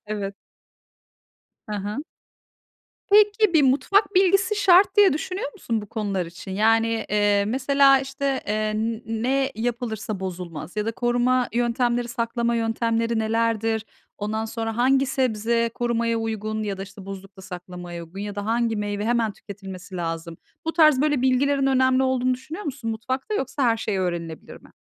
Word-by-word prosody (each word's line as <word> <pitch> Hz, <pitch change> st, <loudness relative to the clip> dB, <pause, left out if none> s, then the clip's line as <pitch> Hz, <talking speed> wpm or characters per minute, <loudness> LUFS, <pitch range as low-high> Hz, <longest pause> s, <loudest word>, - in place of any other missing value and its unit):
Evet. 200 Hz, -2 st, -4 dB, 1.3 s
Hı 210 Hz, -, -3 dB
hı. 205 Hz, +8 st, -4 dB, 1.1 s
Peki 420 Hz, -1 st, +5 dB
bir 300 Hz, -, +6 dB
mutfak 330 Hz, +11 st, +3 dB
bilgisi 390 Hz, +2 st, +3 dB
şart 385 Hz, 0 st, +5 dB
diye 405 Hz, -6 st, +7 dB
düşünüyor 315 Hz, 0 st, -3 dB
musun 225 Hz, -2 st, -3 dB
bu -, -, -9 dB
konular 200 Hz, -5 st, -2 dB
için? 175 Hz, +3 st, -10 dB
Yani, 225 Hz, +3 st, +2 dB
eee, 205 Hz, -1 st, +3 dB
mesela 275 Hz, +2 st, +4 dB
işte, 270 Hz, 0 st, -2 dB
eee, 215 Hz, +1 st, 0 dB
n 225 Hz, +1 st, -2 dB
ne 260 Hz, +5 st, 0 dB
yapılırsa 220 Hz, -3 st, -3 dB
bozulmaz 175 Hz, -2 st, -6 dB
ya 210 Hz, -, -1 dB
da 225 Hz, -, -1 dB
koruma 245 Hz, +1 st, +1 dB
yöntemleri, 240 Hz, 0 st, 0 dB
saklama 235 Hz, 0 st, -1 dB
yöntemleri 230 Hz, 0 st, 0 dB
nelerdir? 225 Hz, 0 st, 0 dB, 0.3 s
Ondan 215 Hz, +2 st, -2 dB
sonra 225 Hz, 0 st, -4 dB
hangi 265 Hz, +2 st, +3 dB
sebze 235 Hz, -3 st, 0 dB
korumaya 235 Hz, -1 st, 0 dB
uygun 215 Hz, -1 st, -3 dB
ya 200 Hz, -2 st, -3 dB
da, 195 Hz, -, -4 dB
işte, 195 Hz, 0 st, -11 dB
buzlukta 195 Hz, 0 st, -9 dB
saklamaya 180 Hz, -2 st, -8 dB
uygun 185 Hz, +4 st, -10 dB
ya 205 Hz, 0 st, -5 dB
da 205 Hz, 0 st, -4 dB
hangi 230 Hz, -1 st, +1 dB
meyve 205 Hz, 0 st, -2 dB
hemen 230 Hz, -2 st, +1 dB
tüketilmesi 190 Hz, -2 st, -9 dB
lazım? 165 Hz, -1 st, -4 dB, 0.3 s
Bu 325 Hz, -, 0 dB
tarz 305 Hz, -5 st, +5 dB
böyle 295 Hz, -3 st, +1 dB
bilgilerin 270 Hz, +2 st, +2 dB
önemli 260 Hz, 0 st, +3 dB
olduğunu 255 Hz, -1 st, +1 dB
düşünüyor 310 Hz, +10 st, -8 dB
musun 270 Hz, -6 st, -4 dB
mutfakta? 260 Hz, -, -3 dB
Yoksa 270 Hz, -3 st, -2 dB
her 230 Hz, -2 st, +3 dB
şey 210 Hz, -3 st, -2 dB
öğrenilebilir 170 Hz, -3 st, -4 dB
mi? -, -, -19 dB
230 Hz, 150 wpm, -24 LUFS, 205-260 Hz, 1.3 s, diye